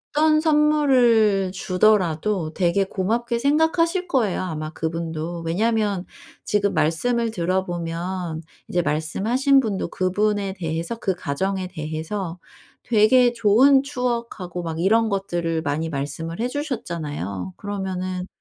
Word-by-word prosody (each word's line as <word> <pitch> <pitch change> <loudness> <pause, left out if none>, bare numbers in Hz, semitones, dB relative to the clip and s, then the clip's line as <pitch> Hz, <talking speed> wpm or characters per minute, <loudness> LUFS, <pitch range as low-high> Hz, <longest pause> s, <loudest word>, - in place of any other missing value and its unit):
어떤 310 0 +4
선물을 255 - +3
주더라도 185 -3 +1
되게 185 +1 +2
고맙게 235 +6 -1
생각하실 325 +6 +2
거예요 230 - +1
아마 155 -4 -4
그분도. 165 +1 -4
왜냐하면 205 +1 0 0.4
지금 205 -1 +1
말씀을 225 +10 +1
들어보면 175 -2 -2 0.3
이제 175 - +1
말씀하신 220 - +2
분도 205 -5 -2
그분에 200 +1 0
대해서, 165 +6 -3
그 190 -5 -1
가정에 185 +4 -2
대해서 165 +2 -5 0.4
되게 240 +2 +4
좋은 240 +5 +5
추억하고 235 -9 -3
막 165 -1 -4
이런 225 +4 +3
것들을 175 -5 -1
많이 155 +2 -1
말씀을 155 +4 -4
해 245 - +1
주셨잖아요. 155 - -4
그러면은 185 -2 -4
190 Hz, 290 characters per minute, -23 LUFS, 165-235 Hz, 0.4 s, 좋은